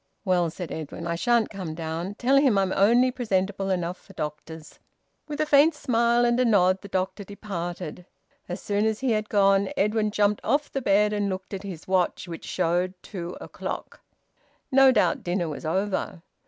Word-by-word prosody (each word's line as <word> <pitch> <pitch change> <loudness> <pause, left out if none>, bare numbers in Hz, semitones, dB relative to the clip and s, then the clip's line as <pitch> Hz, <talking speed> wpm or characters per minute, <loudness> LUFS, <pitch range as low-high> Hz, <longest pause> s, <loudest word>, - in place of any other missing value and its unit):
"Well," 180 -3 +2
said 175 +1 -7
Edwin, 160 +1 -6
"I 170 - -1
shan't 235 +5 +1
come 185 -6 -6
down. 165 +4 -4
Tell 265 +5 +3
him 270 -7 +4
I'm 190 -1 +1
only 240 +6 +4
presentable 195 -5 -1
enough 180 -1 -2
for 195 - -17
doctors." 155 0 -7 0.5
With 295 -1 -5
a 310 - +2
faint 300 +2 +5
smile 235 -2 +2
and 240 +1 +2
a - - +4
nod, 190 -5 +3
the - - -9
doctor 190 +2 -2
departed. 180 -4 -6 0.4
As 180 +2 -4
soon 205 +1 0
as 220 +1 -2
he 265 -2 +1
had 215 0 -1
gone, 195 -1 +3
Edwin 210 +1 +1
jumped 205 0 +1
off 290 +1 0
the 270 - -2
bed 210 -2 +3
and 205 -1 0
looked 190 +1 -5
at 195 - -4
his 185 -5 -8
watch, 185 0 0
which 165 -1 -8
showed 180 +1 0
two 175 -3 -6
o'clock. - - -7 0.7
No 270 0 +7
doubt 180 -9 +2
dinner 175 -1 -1
was 155 +1 -5
over. 185 -1 -2
195 Hz, 180 wpm, -25 LUFS, 175-220 Hz, 0.7 s, No